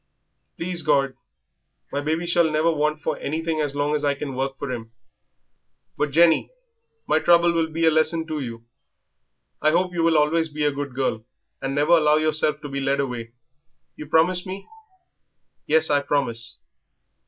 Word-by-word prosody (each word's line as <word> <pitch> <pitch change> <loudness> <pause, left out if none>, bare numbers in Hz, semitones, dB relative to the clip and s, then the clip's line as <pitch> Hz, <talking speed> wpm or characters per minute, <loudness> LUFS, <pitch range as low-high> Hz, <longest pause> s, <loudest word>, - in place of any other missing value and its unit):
"Please 175 0 -2
God, 140 -3 +2 0.8
my 140 - -2
baby 160 +3 -1
shall 170 -1 +3
never 155 +2 +2
want 150 0 -1
for - - -2
anything 160 +1 -2
as 145 -2 -2
long 145 +1 0
as 150 -1 -1
I 145 -1 +1
can 140 -1 -5
work 135 +1 -3
for 140 -2 -5
him. 115 -2 -6 1.0
But, 150 - -1
Jenny, 165 +3 +4 0.6
my 155 - +2
trouble 170 +1 +4
will 165 -1 +1
be 165 +1 -1
a 160 - +5
lesson 160 +1 +1
to 155 -2 -4
you. 115 -4 -6 1.0
I 155 - +4
hope 180 +3 +1
you 170 - -1
will 165 -1 +3
always 160 +2 +2
be 150 0 -2
a 145 - +3
good 140 -2 -6
girl, 130 -4 -1 0.4
and 135 +1 -3
never 145 +1 +1
allow 150 -1 +3
yourself 155 -1 0
to - - -6
be 140 0 -4
led 135 +1 0
away; 120 -4 -4 0.6
you 150 - -9
promise 170 +4 +3
me?" 190 +1 -8 1.0
"Yes, 160 0 +2
I 145 -1 +3
promise." 120 -5 0
150 Hz, 175 wpm, -23 LUFS, 140-160 Hz, 1.0 s, a